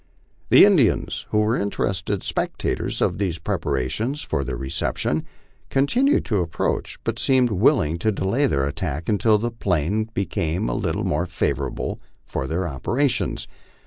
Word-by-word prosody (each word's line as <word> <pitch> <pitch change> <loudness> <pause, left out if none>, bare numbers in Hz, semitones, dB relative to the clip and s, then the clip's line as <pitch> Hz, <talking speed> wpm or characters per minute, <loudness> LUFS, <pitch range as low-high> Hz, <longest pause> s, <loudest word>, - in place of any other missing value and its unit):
The - - +9
Indians, - - +2
who 105 - +2
were 110 +2 +2
interested 100 -2 -1
spectators - - -2
of - - 0
these 90 -5 -1
preparations 105 - -2
for 70 - -1
their 65 -2 -4
reception, 70 +3 -1 0.4
continued 245 - +2
to 105 -4 +1
approach, 85 -2 -2
but - - -2
seemed 130 -3 +3
willing 90 - +2
to 110 +5 +1
delay 110 +8 +1
their 70 -1 +1
attack 80 +1 -3
until 105 +1 +3
the 120 +3 -2
plain 100 -1 0
became 85 -4 -1
a - - -1
little - - -1
more 85 +5 0
favorable - - -2 0.3
for 65 - -3
their 85 +4 -1
operations. 120 - -1
95 Hz, 145 wpm, -23 LUFS, 80-115 Hz, 0.4 s, The